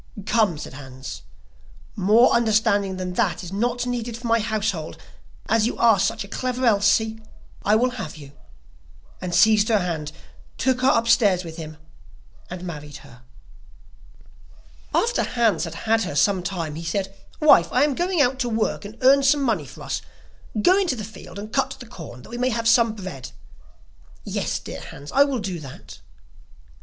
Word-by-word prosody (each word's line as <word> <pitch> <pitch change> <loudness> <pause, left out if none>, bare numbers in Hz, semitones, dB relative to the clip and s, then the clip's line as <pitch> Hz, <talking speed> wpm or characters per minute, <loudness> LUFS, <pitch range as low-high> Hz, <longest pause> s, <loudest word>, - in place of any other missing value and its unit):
'Come,' 215 -7 +2
said 150 - -8
Hans, 130 -1 -9 0.7
'more 215 +5 +5
understanding 215 -4 +2
than 180 -1 -4
that 180 - 0
is 180 +1 -8
not 240 +4 -1
needed 240 -2 -3
for 240 - -11
my 230 0 +3
household, 210 -7 -2 0.5
as 225 0 +3
you - - -4
are 225 -4 +5
such 220 +3 0
a - - -11
clever 255 +4 -2
Elsie, 220 +1 +3 0.4
I 210 - +3
will 250 +3 +2
have 190 -11 -7
you,' 140 -2 -12 0.9
and 180 -1 -3
seized 215 0 +5
her 220 - +4
hand, 165 -6 -3 0.5
took 255 -1 +1
her 260 - +4
upstairs 230 -6 +3
with 165 -1 -9
him, 155 -2 -8 0.7
and 180 0 -7
married 150 -5 -7
her. 125 0 -16 1.7
After 475 +2 +1
Hans 225 -8 +1
had - - -7
had 225 0 +1
her 180 -8 -3
some 190 +5 +3
time, 175 -4 -4
he 165 +2 -7
said: 195 +3 -3 0.2
'Wife, 175 - +5
I 255 - +3
am 295 -1 +2
going 350 +1 +1
out 255 +1 0
to 245 -2 0
work 220 -1 -1
and 215 +3 -10
earn 275 +2 +6
some 275 +1 +3
money 210 - 0
for - - -11
us; - - -3 0.6
go 365 - +4
into 360 -9 0
the 215 - -6
field 215 -1 -11
and 215 +2 -8
cut 270 0 0
the 245 - -9
corn 160 - -11
that - - -14
we 240 - -5
may 250 +1 +2
have 230 -1 -1
some 230 -1 +4
bread.' 185 - -7 0.9
'Yes, - - -2
dear - - -8
Hans, 145 +1 -10
I 280 +1 +5
will 275 -2 -1
do 190 -5 -4
that. 135 -4 -11
215 Hz, 175 wpm, -23 LUFS, 180-240 Hz, 1.7 s, earn